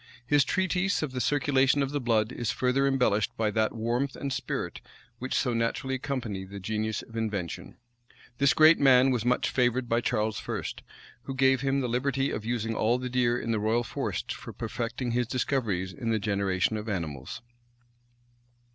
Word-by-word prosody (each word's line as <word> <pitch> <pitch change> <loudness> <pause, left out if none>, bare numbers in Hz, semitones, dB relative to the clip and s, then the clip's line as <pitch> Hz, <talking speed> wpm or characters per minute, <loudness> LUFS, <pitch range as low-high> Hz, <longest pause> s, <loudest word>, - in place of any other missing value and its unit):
His 145 +2 +4
treatise 185 +3 0
of 150 - -3
the 130 -1 -3
circulation 135 +2 +2
of 135 - -3
the 145 -1 -2
blood 110 -3 +1
is 120 -3 -3
further 130 +2 +1
embellished 125 -6 +1
by 110 -2 +1
that 110 +1 0
warmth 120 +5 -1
and 140 -1 -3
spirit 125 - -4 0.4
which 130 +1 -3
so 125 -3 +1
naturally 115 +4 -1
accompany 125 -7 -3
the 100 +1 -8
genius 110 +2 -2
of 115 - -14
invention. 105 -7 -4 0.6
This 140 -2 +4
great 160 +1 +7
man 130 -1 +6
was 120 -4 0
much 125 0 +1
favored 125 0 +1
by 115 +1 +1
Charles 110 -2 -1
I., - - -2 0.6
who 135 - -5
gave 130 -1 +3
him 135 0 +1
the 125 - -1
liberty 135 +3 0
of 105 - -4
using 115 -1 -1
all 115 +2 +2
the 125 0 -4
deer 120 -1 +2
in 115 - -3
the 110 - +1
royal 110 +3 +1
forests - - -3
for - - -9
perfecting 120 +1 -4
his 120 0 0
discoveries 110 -8 -1
on 115 +7 -4
the 110 - +2
generation 100 0 0
of 105 +1 -5
animals. 85 - -4
120 Hz, 180 wpm, -28 LUFS, 110-135 Hz, 0.6 s, great